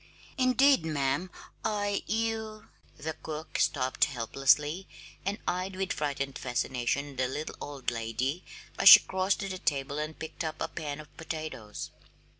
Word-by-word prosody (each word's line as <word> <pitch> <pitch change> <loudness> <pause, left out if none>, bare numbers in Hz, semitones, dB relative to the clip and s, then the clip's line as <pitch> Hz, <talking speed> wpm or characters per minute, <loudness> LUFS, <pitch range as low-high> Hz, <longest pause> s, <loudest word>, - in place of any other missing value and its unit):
"Indeed, 260 - +4
ma'am, 155 +3 0 0.3
I 205 -2 0
you 220 -1 -2
" - - -29
The 160 +1 -4
cook 155 0 -6
stopped 130 -2 +2
helplessly, 145 +7 +1 0.4
and 200 +1 0
eyed 185 +1 -1
with 190 0 -1
frightened 140 -2 -2
fascination 130 +2 -1
the 130 0 +1
little 150 +4 -4
old 140 -4 -3
lady 120 +8 -2 0.4
as - - +10
she - - +13
crossed 190 +2 0
to 195 - -2
the 185 -1 -5
table 140 -1 -1
and 155 +1 -4
picked 160 +1 -6
up 155 -1 -4
a - - -1
pan 150 -2 -5
of 150 -1 -13
potatoes. 155 -10 -6
155 Hz, 150 wpm, -29 LUFS, 135-190 Hz, 0.4 s, she